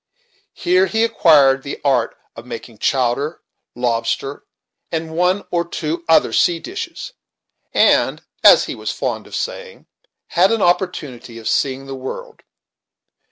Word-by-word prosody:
Here 370 +2 +2
he 225 0 +1
acquired 145 -11 +4
the 140 - -6
art 130 -4 +1 0.2
of 115 - -9
making 115 -2 -9
chowder, 135 +4 0 0.3
lobster, 120 +3 -2 0.5
and 160 -1 -3
one 180 +3 +1
or 170 -1 +1
two 165 0 -4
other 160 - +4
sea 175 - +3
dishes, 455 - -7 0.6
and, - - +3 0.2
as - - +8
he - - -5
was - - -4
fond - - -3
of - - -8
saying, - - -5 0.4
had 185 +4 +3
an 225 -3 +1
opportunity 150 - -1
of 115 - -7
seeing 135 0 0
the 135 - -7
world. 130 0 -7
155 Hz, 135 wpm, -19 LUFS, 130-185 Hz, 0.6 s, as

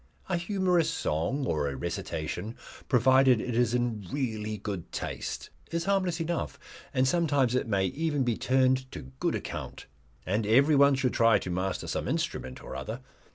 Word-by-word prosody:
A 185 - +1
humorous 180 -2 +1
song 130 - -1
or 75 - 0
a 70 - -5
recitation 85 - -4 0.3
provided 130 0 +5
it 125 +1 -3
is 120 0 +2
in 120 -4 -1
really 110 -6 -2
good 100 -4 -5
taste - - -5 0.2
is 170 0 -2
harmless 190 -4 +1
enough, 165 +1 -2 0.3
and 130 -2 +2
sometimes 145 -6 +2
it 125 - 0
may 100 -3 +1
even 145 - 0
be 120 -2 +1
turned 130 +1 +2
to - - -6 0.2
good - - +1
account. - - -6 0.4
And 105 +3 0
everyone 140 +4 +5
should 130 -2 0
try 115 -2 +5
to 90 - -5
master 95 +1 -2
some - - -2
instrument 65 0 -3
or - - -7
other. 110 - -5
125 Hz, 160 wpm, -29 LUFS, 105-145 Hz, 0.4 s, provided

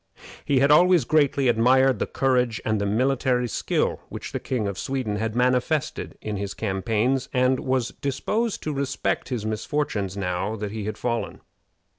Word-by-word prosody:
He 135 -3 +2
had 140 +1 +4
always 175 -2 +5
greatly 140 -2 +2
admired 130 +3 +4
the - - -1
courage 125 -4 +1
and 110 -2 0
the 100 - 0
military 125 +2 +1
skill - - -1
which - - -7
the - - -3
King 120 -6 -2
of 100 -1 -4
Sweden 130 -6 -2
had 110 +1 -2
manifested 125 +4 0
in 105 -1 -4
his 100 0 -4
campaigns, 110 +5 0
and 130 0 +2
was 130 -2 0
disposed 215 - -2
to 155 - -2
respect 140 -1 -2
his 120 -5 -3
misfortunes 110 -3 -2
now 95 +2 -2
that 105 -2 -5
he 110 -1 -5
had 110 - -4
fallen. 120 -1 -3
125 Hz, 165 wpm, -24 LUFS, 110-135 Hz, -, always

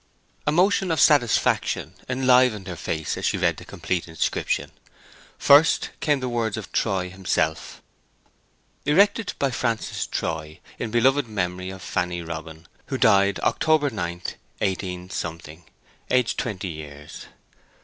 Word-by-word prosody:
A - - +4
motion 185 +3 +3
of 160 - +1
satisfaction 125 -7 +3 0.2
enlivened 125 -5 +3
her 90 -2 -5
face 80 -2 -3
as - - -3
she - - 0
read - - +1
the - - -10
complete 90 -2 -3
inscription. 80 -1 -1 0.7
First 145 +3 +5
came 145 -3 +1
the 130 - -2
words 115 -3 -1
of 105 -4 -7
Troy 95 -4 0
himself:— 90 -4 -2 1.0
Erected 200 +8 +3
by 140 -1 0
Francis 115 -3 -2
Troy 80 -1 -4 0.2
In - - -3
Beloved 130 +4 +3
Memory 90 -3 -3
of 95 0 -9
Fanny 90 -1 -2
Robin 80 0 -8 0.2
Who - - -2
died 100 0 +4
October 155 -3 +2
9, 85 -4 -4 0.4
18—, 90 -4 -4 0.5
Aged 125 -2 +2
20 100 -5 -3
years. 75 -3 -9
100 Hz, 130 wpm, -24 LUFS, 85-130 Hz, 1.0 s, First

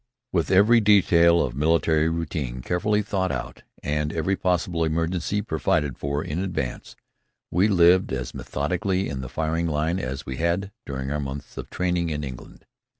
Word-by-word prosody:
With 85 -3 0
every 105 +5 +6
detail 85 -5 +5
of - - -3
military 80 +1 +2
routine 75 -7 -3
carefully 105 +4 +1
thought 95 -2 -1
out - - -5 0.2
and 75 +1 -1
every 85 +5 0
possible 90 -2 0
emergency 85 +5 -1
provided 75 -4 0
for 70 +2 -2
in 75 +2 -3
advance, 90 -10 -4 0.6
we 90 +5 +3
lived 90 -2 +4
as 65 -1 -3
methodically 90 +6 -1
in 70 -2 -4
the 65 - -7
firing 80 +1 -1
line 80 +3 0
as 65 -5 -4
we 65 -1 -5
had 85 +4 0 0.2
during 65 0 -4
our 75 - -1
months 70 0 -6
of - - -7
training 90 -2 -1
in 75 -1 -3
England. 65 -3 -9
80 Hz, 160 wpm, -24 LUFS, 75-90 Hz, 0.6 s, every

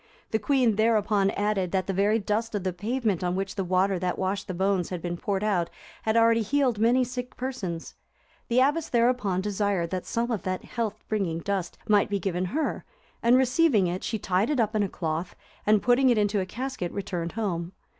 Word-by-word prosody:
The 220 - +1
queen 240 -2 +2
thereupon 215 -3 +3
added, 200 -3 0
that 190 -2 +1
the 195 - -2
very 205 +3 +3
dust 220 +1 -1
of 200 - -2
the 185 -1 -1
pavement 215 -1 -1
on 180 0 0
which 195 0 -2
the 195 - -2
water 185 +1 +1
that 180 0 -1
washed 195 +1 -2
the 185 - -3
bones 190 -1 +1
had 180 - -4
been 175 +1 -3
poured 195 +3 -2
out, 180 -5 +1 0.3
had 220 +1 +1
already 230 0 +5
healed 250 0 +1
many 240 +3 +4
sick 250 0 -6
persons. 230 -11 -4 0.5
The 245 +1 +3
abbess 295 +4 +1
thereupon 235 -6 +2
desired 200 -4 -1
that 185 -1 -3
some 235 +1 -1
of 220 - -1
that 185 0 -3
health 225 -3 -2
bringing 195 -7 -1
dust 185 0 -3
might 205 -1 +4
be 200 - 0
given 185 -1 -1
her, 300 - -2 0.4
and, 240 +2 +5
receiving 255 - +3
it, 180 +2 -2
she 225 - -1
tied 190 +2 0
it 295 -4 0
up 220 -1 +1
in 215 - +2
a 200 - 0
cloth, 165 0 -3 0.3
and, 210 -1 +4
putting 250 +2 +4
it 240 - +3
into 205 -1 +2
a 185 - -2
casket, 245 -5 -4
returned 175 -4 -4
home. 185 -5 -2
205 Hz, 205 wpm, -27 LUFS, 185-230 Hz, 0.5 s, already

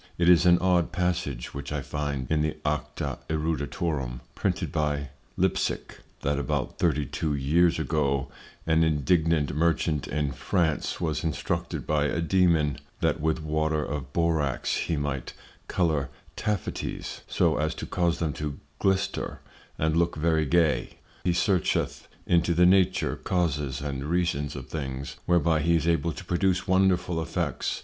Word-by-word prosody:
It 85 0 +3
is 90 0 +6
an 85 0 +7
odd 90 -1 +2
passage 85 -8 -2
which 70 0 -6
I 70 -2 -2
find 75 -3 -3
in 75 -1 +3
the 75 0 -1
Acta 75 0 -2
Eruditorum, 75 -4 -2
printed - - -1
by 75 -2 -1 0.3
Lipsick, - - -1 0.2
that 70 0 0
about 70 - -2
Thirty 75 -4 +2
two 75 +3 -2
Years 80 +5 +3
ago 70 -4 0 0.4
an 80 0 +3
indigent 80 -1 +2
Merchant 80 -2 +1
in 75 -2 -1
France 80 +3 0
was 80 -3 -1
instructed 80 -3 -2
by 75 -1 +1
a 80 - 0
Dæmon, 85 -4 +3 0.2
that 75 - +1
with 80 0 0
Water 80 0 0
of 70 -2 -5
Borax 80 -4 +1
he 80 - -1
might 70 -2 -3 0.3
colour 80 -7 +1 0.3
Taffities, 105 -3 -3
so 80 -3 +2
as 80 +1 0
to - - -5
cause 85 -2 0
them 80 -3 -1
to 75 0 -4 0.2
glister 95 -1 0 0.4
and 80 0 +1
look 85 0 +2
very 80 -1 +1
gay: 85 -1 +2 0.3
He 90 - +2
searcheth 90 0 0 0.2
into 85 0 +2
the 90 +1 +5
Nature, 95 0 +3
Causes, 75 -7 -1
and 70 -1 -3
Reasons 75 -3 0
of 65 -2 -7
things, 70 -3 -5
whereby 85 -2 +3
he 85 +3 +3
is 80 0 +1
able 85 0 +2
to - - -9
produce 90 +2 +1
wonderful 90 -3 +2
effects. 80 - -2
80 Hz, 150 wpm, -27 LUFS, 75-85 Hz, 0.4 s, an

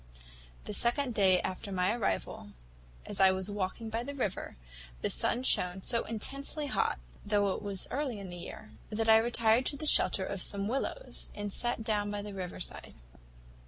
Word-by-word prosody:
The - - -5
second 245 +1 +2
day 190 -3 +5
after 185 +2 -4
my 185 +2 +2
arrival, 220 - -2 0.5
as - - -5
I 190 -1 +7
was 190 +1 -2
walking 205 +3 -3
by 225 +1 -1
the 280 +4 -5
river, 205 - -2 0.5
the - - +1
sun 230 - 0
shone 180 -6 +1
so 230 - +1
intensely 275 +7 -2
hot 265 - +1 0.3
(though 205 -1 +2
it - - -5
was 200 -2 -1
early 265 -4 -1
in 195 -3 -7
the 175 - -6
year), 215 +5 -8 0.2
that 220 +1 -1
I 220 - +9
retired 230 +1 +3
to 285 - -2
the 310 - -5
shelter 195 -9 +4
of 195 -1 -4
some 200 +2 0
willows, 275 - -3
and 205 -1 -4
sat 240 -2 0
down 210 -2 +1
by 205 0 -3
the 205 -1 -7
river 185 -2 -5
side. - - -4
210 Hz, 185 wpm, -32 LUFS, 195-240 Hz, 0.5 s, I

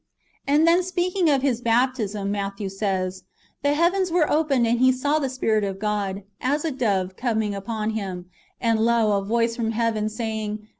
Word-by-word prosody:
And 295 +3 +4
then, 340 +2 +5
[speaking 365 -1 0
of 275 -2 +2
His] 250 -4 +1
baptism, 225 -4 0
Matthew 200 0 -3
says, 190 -2 -2 0.2
" - - -37
The 285 0 +2
heavens 360 +3 +2
were 330 -3 +3
opened, 290 -6 +2
and 235 +1 +1
He 260 +1 +5
saw 285 +4 0
the 275 -3 -1
Spirit 220 -5 0
of 195 -1 -3
God, 205 -1 -2 0.2
as 290 +5 0
a 320 - 0
dove, 195 -8 -1
coming 220 -3 -1
upon 215 +2 -3
Him: 190 -5 -4 0.3
and 230 -2 +1
lo 230 -1 +3
a 200 - +1
voice 230 +2 0
from 225 -2 -1
heaven, 220 -2 0
say 220 0 -3
ing. 210 0 -5
230 Hz, 190 wpm, -24 LUFS, 210-275 Hz, 0.3 s, then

